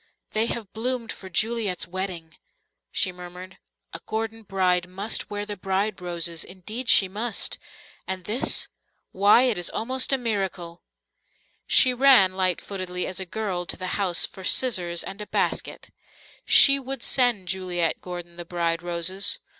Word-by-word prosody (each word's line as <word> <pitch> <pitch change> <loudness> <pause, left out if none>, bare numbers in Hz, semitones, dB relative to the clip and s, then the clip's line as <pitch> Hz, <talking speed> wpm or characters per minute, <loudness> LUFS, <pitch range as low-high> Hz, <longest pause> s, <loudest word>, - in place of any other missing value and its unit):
"They 220 +1 +1
have 225 -5 -5
bloomed 240 +1 -3
for 190 - -10
Juliet's 215 0 0
wedding," 175 -3 -6 0.6
she 185 - +1
murmured. 180 +1 -11 0.3
"A - - -6
Gordon 225 +1 -4
bride 185 -3 0
must 195 +4 -2
wear 205 0 -4
the 205 - -6
bride 195 +1 -2
roses, 170 -2 -1
indeed 215 +7 -5
she 195 - +7
must. 215 +4 -1 0.5
And 190 -1 -4
this 220 +7 +1 0.4
why, 205 +5 +5
it 240 -8 +1
is 175 - +2
almost 255 +4 -1
a 270 - +3
miracle." 195 -7 -4 0.9
She 255 - +6
ran, 245 -7 +5
light 185 -2 +1
footedly 185 -2 -4
as 185 - -5
a 190 - -4
girl, 185 -3 -4
to - - -2
the 185 0 -5
house 180 -3 +2
for 190 - -11
scissors 180 -7 +2
and 195 +2 -8
a 210 - -6
basket. - - -3 0.5
She 275 -1 +7
would 265 -2 -6
send 245 -8 +2
Juliet 175 -2 -1
Gordon 175 -1 -8
the 175 - -6
bride 170 -1 -2
roses. 175 - +3
190 Hz, 155 wpm, -24 LUFS, 180-220 Hz, 0.9 s, she